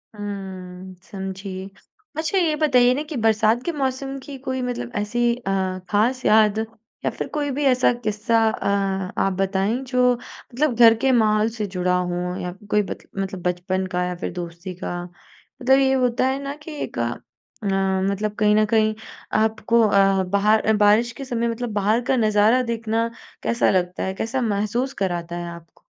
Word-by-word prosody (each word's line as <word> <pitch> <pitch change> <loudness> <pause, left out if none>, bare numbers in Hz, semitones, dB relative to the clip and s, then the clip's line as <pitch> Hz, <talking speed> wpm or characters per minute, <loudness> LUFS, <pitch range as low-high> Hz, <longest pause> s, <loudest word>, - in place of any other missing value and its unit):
हुँ, 190 -2 -7 0.2
समझी। 190 -1 -6 0.5
अच्छा, 315 +4 0
ये 330 -4 +2
बताइए 250 -4 +5
ना 290 +3 -2
कि 305 - -5
बरसात 220 +1 +2
के 340 - 0
मौसम 270 -1 -2
की 275 -1 -8
कोई 260 0 -1
मतलब 245 -1 -4
ऐसी 210 +3 -2 0.2
अ, 240 -5 -6 0.4
ख़ास 240 +5 +1
याद 215 -1 +5 0.5
या - - +3
फिर - - -5
कोई 290 -2 -1
भी 285 +3 -2
ऐसा 255 -1 +4
किस्सा 215 +2 +1
अ, 195 -3 -1
आप 195 - +1
बताएँ, 195 +4 0
जो 250 -1 +3
मतलब 250 +3 -3
घर 230 -1 +7
के 265 - +3
माहौल 215 0 +2
से 220 -2 -4
जुड़ा 180 0 +1
हो 180 0 -2
या 180 - -3 0.2
कोई 210 - +4
बत - - -8
मतलब 195 -1 -3
बचपन 180 +1 -1
का 180 - +1
या 180 0 -3
फिर 175 - -4
दोस्ती 175 +1 -6
का। 175 0 -3 0.6
मतलब 265 +2 +5
ये 265 -1 +3
होता 250 +1 +2
है 265 +1 -1
ना 280 +1 -4
कि 300 +2 -11
एक - - -6
अ, - - 0 0.5
मतलब 195 +1 0
कहीं 210 -1 +4
न 215 0 +4
कहीं 215 0 +2 0.5
आपको 220 +1 +2
अ, 195 -1 +3
बाहर 210 +3 +2
बारिश 210 +3 +4
के - - -5
समय 235 -2 -1
मतलब 230 -1 -3
बाहर 210 +3 +2
का 265 - +3
नज़ारा 215 +2 +4
देखना 230 0 -1 0.3
कैसा 235 - +2
लगता 180 -1 0
है, 190 - -2
कैसा 230 +6 -2
महसूस 230 +4 -1
कराता 175 -2 -2
है 175 - -5
आपको? 170 -1 -14
215 Hz, 175 wpm, -22 LUFS, 190-245 Hz, 0.6 s, घर